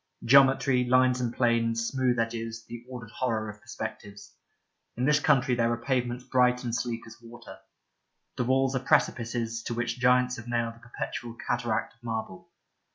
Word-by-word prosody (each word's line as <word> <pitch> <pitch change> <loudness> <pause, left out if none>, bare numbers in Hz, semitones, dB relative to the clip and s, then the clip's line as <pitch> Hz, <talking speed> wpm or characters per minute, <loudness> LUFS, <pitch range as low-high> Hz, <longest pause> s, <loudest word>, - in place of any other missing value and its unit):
Geometry, 135 0 +5
lines 130 0 +3
and 120 -2 -1
planes, 115 -1 +1
smooth 130 -1 0
edges, 115 0 -3
the 120 0 -8
ordered 120 -4 -8
horror 110 -4 -2
of 105 0 -18
perspectives. 100 0 -8 0.6
In 125 - 0
this 150 +1 +4
country 130 -3 +3
there 115 -1 +2
are 120 - 0
pavements 125 0 -1
bright 125 -1 +2
and 120 -2 -3
sleek 115 -1 -3
as 115 +1 -14
water. 120 +1 -12 0.8
The 125 - -1
walls 135 +1 +2
are - - +1
precipices 120 -4 0
to 120 - -4
which 115 0 -2
giants 125 0 +3
have 110 0 -9
nailed 115 -1 -1
a 115 - -19
perpetual 120 0 -6
cataract 120 -3 -1
of 115 - -33
marble. 110 -5 -5
120 Hz, 165 wpm, -28 LUFS, 115-125 Hz, 0.8 s, Geometry